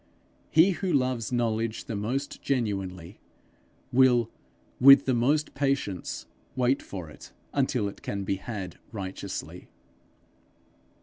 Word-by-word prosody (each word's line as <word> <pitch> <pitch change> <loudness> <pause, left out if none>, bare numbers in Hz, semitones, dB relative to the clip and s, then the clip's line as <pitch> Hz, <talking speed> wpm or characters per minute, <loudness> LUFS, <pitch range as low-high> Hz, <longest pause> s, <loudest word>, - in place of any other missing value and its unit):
He 165 +5 +5
who 185 0 -2
loves 130 -5 0
knowledge 115 -2 -1
the 110 - -4
most 125 +7 -3
genuinely, 95 -8 -2 0.7
will 125 -3 +4 0.5
with 140 +1 +9
the 130 - +2
most 140 +6 +1
patience 135 -10 -2 0.3
wait 130 +1 +2
for 90 -5 -7
it 75 - -13 0.2
until 130 -6 +1
it 100 - -8
can 100 -1 -3
be 95 0 -1
had 95 -4 -6
righteously. 95 -3 -6
120 Hz, 115 wpm, -27 LUFS, 100-135 Hz, 0.7 s, with